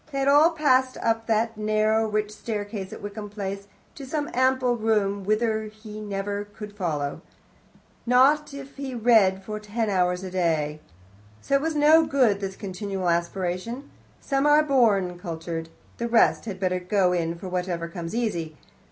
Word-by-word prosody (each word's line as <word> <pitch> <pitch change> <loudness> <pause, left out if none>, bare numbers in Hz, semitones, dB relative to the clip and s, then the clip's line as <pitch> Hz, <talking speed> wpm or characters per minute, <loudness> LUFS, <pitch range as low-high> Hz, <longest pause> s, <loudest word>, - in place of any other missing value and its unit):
They 275 - -4
had 275 0 0
all 295 +4 +6
passed 260 -5 +2
up 225 0 -1
that 225 0 +1
narrow, 215 +1 +1
rich 210 0 -1
staircase 205 -2 -5
at - - -9
Wickham 205 0 -6
Place, 200 -1 -5 0.3
to 280 - -10
some 295 +3 -3
ample 260 -1 +2
room, 210 -3 0
whither 220 +2 0
he 215 0 -10
could 210 -1 -7
never 200 +1 -3 0.3
follow 155 -7 -1
them, - - -11 0.9
not 275 +5 +4
if 275 0 -10
he 270 -2 -5
read 215 -5 +4
for 215 +2 -5
ten 210 +1 -2
hours 180 -1 +1
a 185 - -6
day. 160 -4 0 0.7
Oh, - - +4
it 275 - +4
was 320 +1 -1
not 310 +2 +5
good, 245 -8 +3
this 195 -1 -4
continual 195 -2 -3
aspiration. 180 +9 -2 0.3
Some 275 0 0
are 300 +1 +6
born 210 -11 +2
cultured; 165 -2 -5 0.3
the 235 - -1
rest 230 -1 +3
had 195 -4 -6
better 185 -1 0
go 180 0 +1
in 170 -1 -1
for 180 +3 -8
whatever 180 -2 -2
comes 170 +2 -6
easy. 170 -10 -2
210 Hz, 170 wpm, -25 LUFS, 185-245 Hz, 0.9 s, all